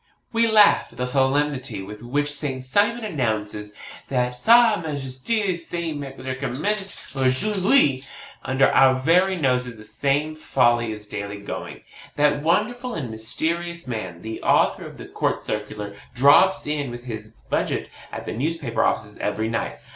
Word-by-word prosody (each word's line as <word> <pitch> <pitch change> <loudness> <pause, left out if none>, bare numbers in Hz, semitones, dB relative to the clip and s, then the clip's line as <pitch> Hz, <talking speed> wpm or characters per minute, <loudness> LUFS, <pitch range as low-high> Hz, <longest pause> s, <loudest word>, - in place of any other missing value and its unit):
We 230 0 +3
laugh 215 -2 +5
at - - -18
the 125 - -1
solemnity 135 -2 0
with 105 +2 -10
which 145 +5 -1
Saint 140 -3 -3
Simon 205 - +1
announces 110 - -3 0.3
that 125 -2 0
SA 230 - +5
MAJESTE 155 - -2
SE 170 -1 -3
MEDICAMENTE 140 +6 -3
AUJOURD'HUI. 140 - +3 0.4
Under 130 +1 +3
our 130 -1 +5
very 180 +7 +3
noses 125 -5 0
the 110 - -12
same 140 +7 -1
folly 120 -6 +2
is 105 -1 -7
daily 100 0 -6
going 100 - -6
on. - - -18 0.3
That 145 -1 +2
wonderful 235 - 0
and 130 -8 -4
mysterious 170 +9 -3
man, 95 -8 -5
the 110 0 -6
author - - +2
of - - -12
the - - -9
COURT - - -1
CIRCULAR, 105 -1 -5 0.2
drops 145 +9 +5
in 145 -3 -2
with 120 0 -8
his 110 -2 -8 0.2
budget - - -1 0.2
at - - -7
the - - -4
newspaper 140 -2 -1
offices 105 0 -1
every 110 +1 -1
night. 115 - -3
135 Hz, 145 wpm, -23 LUFS, 115-165 Hz, 0.4 s, laugh